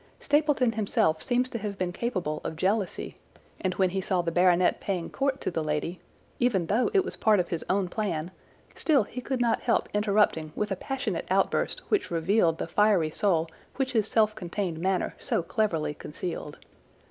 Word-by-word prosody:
Stapleton 290 Hz, -4 st, +2 dB
himself 195 Hz, -7 st, +1 dB
seems 245 Hz, +5 st, +1 dB
to 230 Hz, -, -3 dB
have 205 Hz, -1 st, -4 dB
been 185 Hz, -1 st, -1 dB
capable 180 Hz, -9 st, -2 dB
of -, -, -4 dB
jealousy, 195 Hz, +3 st, -1 dB, 0.4 s
and 185 Hz, -1 st, -1 dB
when 185 Hz, -2 st, +2 dB
he 190 Hz, +1 st, -1 dB
saw 185 Hz, -1 st, 0 dB
the 170 Hz, -, -1 dB
baronet 180 Hz, +1 st, +3 dB
paying 180 Hz, -4 st, -3 dB
court 275 Hz, 0 st, 0 dB
to -, -, -2 dB
the 165 Hz, -2 st, -2 dB
lady, 155 Hz, +3 st, -2 dB, 0.4 s
even 225 Hz, -8 st, +2 dB
though 220 Hz, +9 st, +2 dB
it 390 Hz, -2 st, +3 dB
was -, -, -5 dB
part 215 Hz, -2 st, +4 dB
of 175 Hz, -, -1 dB
his 170 Hz, -, -3 dB
own 190 Hz, -1 st, +2 dB
plan, 175 Hz, -4 st, -2 dB, 0.4 s
still 290 Hz, -7 st, +3 dB
he 250 Hz, +4 st, -7 dB
could 265 Hz, 0 st, -2 dB
not 235 Hz, -2 st, +2 dB
help 235 Hz, -, +1 dB
interrupting 205 Hz, -7 st, +2 dB
with 210 Hz, -1 st, -2 dB
a -, -, +1 dB
passionate 270 Hz, +7 st, -3 dB
outburst -, -, +1 dB
which 415 Hz, -3 st, +1 dB
revealed 170 Hz, 0 st, +2 dB
the -, -, -3 dB
fiery 190 Hz, -3 st, +3 dB
soul 170 Hz, -4 st, +1 dB, 0.3 s
which 265 Hz, -2 st, -1 dB
his 220 Hz, -3 st, +2 dB
self 215 Hz, -1 st, +3 dB
contained 175 Hz, -3 st, -4 dB
manner 185 Hz, +1 st, 0 dB
so -, -, 0 dB
cleverly 170 Hz, -5 st, 0 dB
concealed. 150 Hz, 0 st, -6 dB
195 Hz, 180 wpm, -27 LUFS, 170-225 Hz, 0.4 s, part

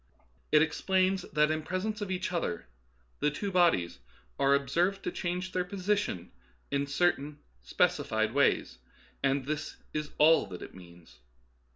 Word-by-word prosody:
It 150 Hz, 0 st, +6 dB
explains 185 Hz, +4 st, +1 dB
that 150 Hz, 0 st, +3 dB
in 155 Hz, 0 st, -1 dB
pres 185 Hz, +5 st, -3 dB
ence 215 Hz, 0 st, -3 dB
of 205 Hz, -, -3 dB
each 185 Hz, +1 st, -2 dB
other 85 Hz, -, -2 dB, 0.5 s
the 150 Hz, -, +2 dB
two 195 Hz, +7 st, -4 dB
bodies 165 Hz, -, +2 dB, 0.4 s
are 140 Hz, 0 st, +4 dB
observed 170 Hz, +8 st, 0 dB
to -, -, -2 dB
change 180 Hz, +1 st, -3 dB
their 180 Hz, -1 st, 0 dB
positions 185 Hz, -, -2 dB, 0.4 s
in 140 Hz, -, +1 dB
a 140 Hz, -, -3 dB
certain 145 Hz, -1 st, 0 dB, 0.2 s
specified 110 Hz, -, +1 dB
way, 140 Hz, +1 st, +3 dB, 0.6 s
and 135 Hz, -1 st, +1 dB
this 155 Hz, +1 st, -4 dB, 0.2 s
is 150 Hz, -1 st, -3 dB
all 160 Hz, -3 st, +5 dB
that 90 Hz, -2 st, -8 dB
it -, -, -10 dB
means. 85 Hz, -8 st, -15 dB
155 Hz, 155 wpm, -30 LUFS, 135-185 Hz, 0.6 s, It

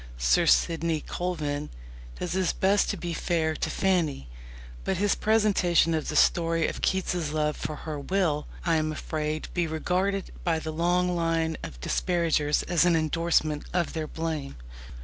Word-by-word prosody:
Sir -, -, +3 dB
Sidney 165 Hz, -, +2 dB
Colvin 150 Hz, -5 st, -3 dB, 0.5 s
does 180 Hz, -, -3 dB
his 185 Hz, 0 st, +1 dB
best 195 Hz, +2 st, +2 dB
to 205 Hz, -, -1 dB
be 175 Hz, -1 st, -4 dB
fair 160 Hz, -1 st, 0 dB
to -, -, -2 dB
Fanny, 165 Hz, -, 0 dB, 0.5 s
but 190 Hz, -, -1 dB
his 205 Hz, +2 st, +2 dB
presentation 205 Hz, -6 st, +3 dB
of 155 Hz, -2 st, -1 dB
the 155 Hz, -, -3 dB
story 165 Hz, +1 st, +3 dB
of -, -, -5 dB
Keats's 180 Hz, -4 st, 0 dB
love 150 Hz, -1 st, 0 dB
for 155 Hz, -, -4 dB
her 155 Hz, -2 st, -4 dB
will, 155 Hz, -2 st, 0 dB, 0.2 s
I 165 Hz, -2 st, +3 dB
am 155 Hz, 0 st, 0 dB
afraid, 155 Hz, 0 st, -3 dB
be 175 Hz, -2 st, 0 dB
regarded 185 Hz, +5 st, -1 dB
by 165 Hz, -2 st, +1 dB
the 160 Hz, 0 st, -5 dB
long 175 Hz, +2 st, +1 dB
line 165 Hz, -1 st, 0 dB
of -, -, -7 dB
her -, -, -16 dB
disparagers 160 Hz, -, +1 dB
as 175 Hz, -2 st, +2 dB
an 175 Hz, -1 st, +4 dB
endorsement 155 Hz, -1 st, +1 dB
of 175 Hz, -2 st, 0 dB
their 160 Hz, -2 st, -3 dB
blame. 160 Hz, -4 st, -4 dB
165 Hz, 165 wpm, -27 LUFS, 155-180 Hz, 0.5 s, an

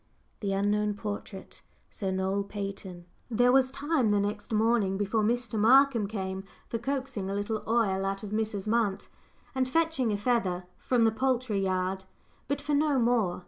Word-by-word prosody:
The 200 Hz, -2 st, -2 dB
Unknown 205 Hz, +1 st, +1 dB
Portrait 205 Hz, -1 st, -7 dB, 0.3 s
SIR 195 Hz, -4 st, -3 dB
NOEL 190 Hz, +1 st, -1 dB
PATON. 195 Hz, -3 st, -6 dB, 0.2 s
There 245 Hz, +2 st, +4 dB
was 260 Hz, 0 st, +4 dB
time 275 Hz, -3 st, 0 dB
the 205 Hz, 0 st, +3 dB
next 205 Hz, +1 st, -3 dB
morning, 215 Hz, -3 st, +2 dB
before 205 Hz, +2 st, 0 dB
Mr. 235 Hz, +1 st, 0 dB
Markham 245 Hz, -1 st, +5 dB
came, 190 Hz, -2 st, -4 dB, 0.2 s
for 230 Hz, -, -3 dB
coaxing 260 Hz, -5 st, -3 dB
a 195 Hz, -, -2 dB
little 205 Hz, +2 st, -2 dB
oil 215 Hz, -4 st, +2 dB
out 195 Hz, +1 st, -2 dB
of 205 Hz, -, -6 dB
Mrs. 215 Hz, -2 st, -2 dB
Munt, 215 Hz, -3 st, 0 dB, 0.4 s
and 260 Hz, -1 st, 0 dB
fetching 320 Hz, -6 st, +1 dB
a 205 Hz, -, 0 dB
feather 200 Hz, -6 st, 0 dB
from 245 Hz, -2 st, +2 dB
the 225 Hz, -, +4 dB
poultry 250 Hz, -3 st, 0 dB
yard, 190 Hz, 0 st, -1 dB, 0.4 s
but 280 Hz, +1 st, -1 dB
for 295 Hz, -, -2 dB
no 290 Hz, -1 st, +3 dB
more. 230 Hz, -7 st, +2 dB
215 Hz, 165 wpm, -29 LUFS, 195-245 Hz, 0.4 s, Markham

